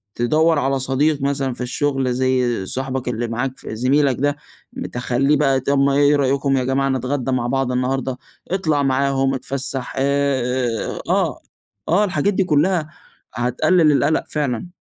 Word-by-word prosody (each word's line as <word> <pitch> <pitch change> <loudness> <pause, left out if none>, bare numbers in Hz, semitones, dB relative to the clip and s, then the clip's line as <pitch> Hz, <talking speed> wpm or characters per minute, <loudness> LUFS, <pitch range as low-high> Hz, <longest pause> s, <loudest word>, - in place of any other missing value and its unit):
تدوّر 155 +6 +2
على 135 0 0
صديق 140 +3 +1
مثلًا 140 -2 -1
في 125 - -9
الشغل 135 0 -1
زي 125 -4 0
صاحبك 130 +3 -3
اللي 120 0 -2
معاك 125 +3 -3
ف - - -13
زميلك 130 +4 +1
ده. 145 +1 +1 0.4
م 260 0 -6
تخلّيه 125 +4 0
بقى، 135 -2 +2
طب 140 +2 0
ما 140 0 +3
إيه 145 +1 +4
رأيكم 135 0 +1
يا 130 - 0
جماعة 135 +2 0
نتغدّى 130 0 -1
مع 120 -2 0
بعض 135 0 0
النهاردة؟ 130 0 -1 0.3
اطلع 155 -7 +1
معاهم، 135 0 +1
اتفسّح 135 0 -4
آآ 130 -4 0
آه، - - +1 0.5
آه. 180 +6 +4
الحاجات 195 0 0
دي 190 - +2
كلّها، 165 0 +1 0.4
هتقلل 140 +8 +2
القَلَق 145 +2 +2
فعلًا. 150 +3 -2
135 Hz, 155 wpm, -20 LUFS, 130-145 Hz, 0.5 s, إيه